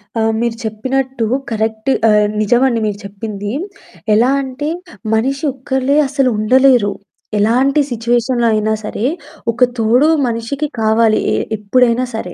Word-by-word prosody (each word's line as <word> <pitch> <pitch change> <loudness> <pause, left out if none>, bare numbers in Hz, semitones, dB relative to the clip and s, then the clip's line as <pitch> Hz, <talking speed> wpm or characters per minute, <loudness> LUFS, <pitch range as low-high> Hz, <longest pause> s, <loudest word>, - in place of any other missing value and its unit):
అ! 225 - 0 0.2
మీరు 235 -1 -1
చెప్పినట్టు 260 +3 -2 0.3
కరెక్ట్ 220 +2 -2 0.2
ఆహ్, 210 -1 +4
నిజమండి 240 +3 +2
మీరు 205 -1 -2
చెప్పింది. 205 0 -6 0.6
ఎలా 230 +4 +4
అంటే 275 +3 -4 0.5
మనిషి 270 +6 -1
ఒక్కలే 265 +1 -1
అసలు 270 -1 +1
ఉండలేరు. 245 -1 +4 0.5
ఎలాంటి 255 +7 +2
సిట్యుయేషన్‌లో 240 +1 0
అయినా 215 0 +1
సరే! 210 +2 -3 0.5
ఒక 245 - +1 0.2
తోడు 240 +7 +3 0.2
మనిషికి 240 +6 -3
కావాలి 220 0 +3 0.2
ఏహ్, - - -1
ఎప్పుడైనా 240 +3 +2
సరే. 180 -5 -5
235 Hz, 120 wpm, -16 LUFS, 220-260 Hz, 0.6 s, ఆహ్